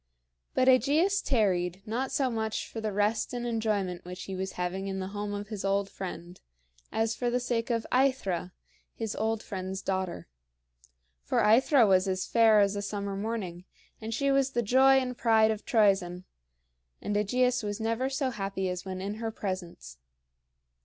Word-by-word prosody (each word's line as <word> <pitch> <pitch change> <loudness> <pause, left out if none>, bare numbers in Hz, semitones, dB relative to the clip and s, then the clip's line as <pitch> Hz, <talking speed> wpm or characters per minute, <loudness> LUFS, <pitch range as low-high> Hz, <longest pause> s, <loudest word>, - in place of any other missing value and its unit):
But 255 - +3
AEgeus 300 - +4
tarried, 190 -6 +1
not 245 +5 -2
so 265 -3 +1
much 220 -1 -2
for 225 - -6
the 215 -1 -2
rest 210 +4 0
and 240 0 -3
enjoyment 210 -6 -1
which 180 +1 -8
he 195 - -6
was 190 0 -4
having 180 +2 -3
in 190 -1 -3
the 190 0 -4
home 205 0 -4
of 205 0 -5
his 210 -3 -5
old 195 0 0
friend, 175 -2 -7 0.5
as 225 0 0
for 245 - -1
the 245 +1 +1
sake 240 -1 -2
of 230 -2 0
AEthra, 250 -10 +1 0.4
his 220 -2 -4
old 220 0 -1
friend's 190 -1 -5
daughter. 185 - -3 1.0
For - - +1
AEthra 235 +4 +5
was 190 0 +4
as 185 0 -1
fair 225 -2 +5
as 200 0 +2
a 200 - -2
summer 200 -1 -4
morning, 195 -4 -4 0.4
and 220 +1 -5
she 275 +4 +1
was 275 -1 +2
the 240 - +1
joy 265 +5 +5
and 255 -1 -1
pride 220 -2 +4
of 215 -1 -5
Troezen; 195 -5 +2 0.8
and 205 - -3
AEgeus 250 +5 +2
was 205 -1 -4
never 230 +4 -1
so 270 -1 -1
happy 195 -3 -3
as 180 0 -4
when 185 -1 -5
in 200 +2 -4
her 225 - -1
presence. 175 - -6
210 Hz, 175 wpm, -29 LUFS, 190-235 Hz, 1.0 s, AEthra